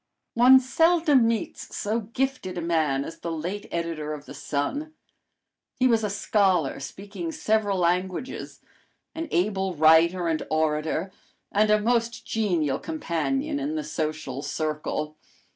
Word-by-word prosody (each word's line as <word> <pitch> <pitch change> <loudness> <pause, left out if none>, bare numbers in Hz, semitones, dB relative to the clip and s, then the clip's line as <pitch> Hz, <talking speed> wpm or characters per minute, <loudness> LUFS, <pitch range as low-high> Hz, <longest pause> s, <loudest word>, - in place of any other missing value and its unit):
One 255 +3 +8
seldom 305 -1 +3
meets 230 -2 -3
so 215 +3 0
gifted 235 -4 -3
a - - -2
man 155 -5 +1
as 165 - -9
the 170 - -4
late 175 +6 -4
editor 165 -3 -3
of 145 -1 -11
the - - -10
Sun. 285 - -3 0.8
He 255 - +2
was 230 -3 +3
a 210 - 0
scholar, 195 -7 +1
speaking 190 +3 -6
several 210 +1 +1
languages; 180 +7 -2 0.5
an 325 0 -4
able 190 0 0
writer 165 +3 +5
and 160 -1 0
orator, 155 +3 0 0.4
and 210 +1 +3
a 210 0 +5
most 230 +1 0
genial 175 -10 0
companion 285 - -2
in 290 +2 -2
the 310 - -2
social 155 - -3
circle. 155 +1 -3
185 Hz, 135 wpm, -26 LUFS, 160-230 Hz, 0.8 s, One